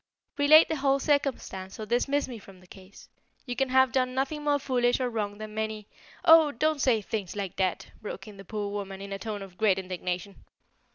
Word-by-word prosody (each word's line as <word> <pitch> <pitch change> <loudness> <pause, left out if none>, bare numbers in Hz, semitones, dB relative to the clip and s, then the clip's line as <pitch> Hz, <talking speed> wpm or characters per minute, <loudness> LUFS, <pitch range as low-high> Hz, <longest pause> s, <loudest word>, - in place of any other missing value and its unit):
Relate 310 +3 +7
the 320 - -2
whole 275 0 +2
circumstance 270 -10 -1
or 215 - -4
dismiss 275 +5 0
me 240 -3 -7
from 195 -2 -15
the 180 - -19
case. 190 +2 -15 0.4
You 245 -2 -4
can 270 +1 0
have 260 0 +4
done 255 -1 0
nothing 275 +3 -2
more 290 -1 +2
foolish 245 -3 +1
or 250 -1 -1
wrong 205 -2 -3
than 215 0 -8
many 220 -1 -3 0.2
" - - -20
"Oh, 320 -2 +7
don't 305 +3 0
say 230 -6 +2
things 200 -3 -4
like 200 -3 -4
that!" 185 -2 -1
broke 205 -2 -7
in 210 -2 -11
the 195 - -10
poor 205 +1 -4
woman 195 -1 -5
in 200 0 -7
a 195 - -5
tone 210 -2 -5
of 185 -2 -13
great 210 -4 +3
indignation. 185 +1 -5
220 Hz, 215 wpm, -28 LUFS, 195-270 Hz, 0.4 s, Relate